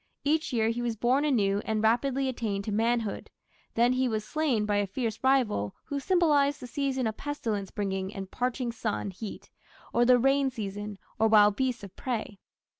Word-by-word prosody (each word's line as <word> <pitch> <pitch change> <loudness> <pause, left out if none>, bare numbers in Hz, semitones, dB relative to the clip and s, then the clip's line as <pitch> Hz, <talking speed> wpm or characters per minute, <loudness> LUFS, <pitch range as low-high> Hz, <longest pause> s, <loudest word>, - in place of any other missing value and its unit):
Each 310 +2 +1
year 225 -2 +2
he 235 +1 -2
was 235 -2 -1
born 250 +6 +2
anew 205 -8 +2
and 220 -1 -1
rapidly 265 +4 +2
attained 215 -6 -2
to 215 - -4
manhood; 225 0 0 0.5
then 240 +2 +4
he 255 0 +1
was 215 -1 -2
slain 280 -9 0
by 205 -1 +1
a 205 -1 +1
fierce 225 +2 -3
rival 245 - +2
who 285 - -3
symbolized 290 -4 +3
the - - -8
season 265 0 -1
of 220 -1 -2
pestilence 220 -9 -3
bringing 195 -2 -3
and 195 -2 -7
parching 250 -1 -1
sun 220 -3 -3
heat, 200 +3 -8 0.4
or 240 - +4
the 250 +1 +6
rainy 270 +2 +3
season, 205 -3 -5 0.2
or 225 - +5
wild 210 -2 +6
beasts 255 -3 -1
of 195 -2 -10
prey. 220 -5 -4
230 Hz, 185 wpm, -28 LUFS, 210-265 Hz, 0.5 s, the